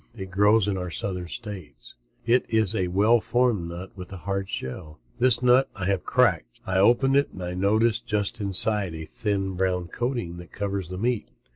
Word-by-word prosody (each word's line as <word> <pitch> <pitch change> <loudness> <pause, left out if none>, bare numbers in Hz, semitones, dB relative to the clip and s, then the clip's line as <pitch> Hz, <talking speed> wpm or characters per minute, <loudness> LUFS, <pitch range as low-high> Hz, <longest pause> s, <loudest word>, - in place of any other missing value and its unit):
It 95 -2 -7
grows 105 +2 +4
in 95 -2 -1
our 90 0 -4
southern 90 +1 -4
states. 95 -2 -8 0.3
It 120 0 +2
is 110 -2 +3
a 95 -3 0
well 105 +6 +3
formed 120 -9 +1
nut 90 +2 -8
with 90 -1 -9
a 95 - -7
hard 100 +1 -3
shell. 75 +4 -6 0.2
This 125 0 +3
nut 125 +2 +4
I 95 -4 -4
have 100 0 +1
is - - -30
cracked. - - +1
I 95 0 0
open 120 +6 +4
it 140 0 +3
and 95 - -7
I 90 0 -4
notice 110 +5 +2
just 105 0 -2
inside 100 -2 +2
a 80 0 -6
thin, 100 0 -2
brown 90 -1 -1
coating 120 -8 -3
that 85 -1 -11
covers 100 -3 -3
the 90 - -6
meat. 115 - -1
100 Hz, 195 wpm, -25 LUFS, 90-110 Hz, 0.3 s, grows